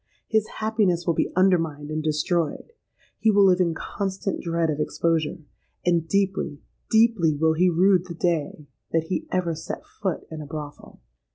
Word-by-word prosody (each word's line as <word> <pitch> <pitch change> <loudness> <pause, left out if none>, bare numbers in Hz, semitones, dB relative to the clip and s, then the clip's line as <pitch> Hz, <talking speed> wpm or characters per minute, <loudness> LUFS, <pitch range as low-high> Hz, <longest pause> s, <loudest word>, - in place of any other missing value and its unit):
His 220 -1 +1
happiness 210 -6 +1
will 170 - +2
be - - 0
undermined 165 -6 +2
and 155 0 -1
destroyed; 155 - -1 0.5
he 220 - +3
will 200 -2 +5
live 185 -1 +4
in 170 -2 +1
constant 195 +2 -3
dread 165 -1 0
of 150 - -4
exposure: 160 0 0 0.5
and 170 -2 +2
deeply—deeply 195 0 +1
will 160 +2 +2
he 180 +3 +3
rue 185 +2 +4
the 175 -1 -9
day 160 -3 -1 0.3
that 165 0 0
he 185 - -2
ever 180 -2 0
set 160 - -6
foot 190 -5 -4
in 160 -1 -6
a 150 - -8
brothel! 150 -1 -8
170 Hz, 160 wpm, -24 LUFS, 160-190 Hz, 0.5 s, will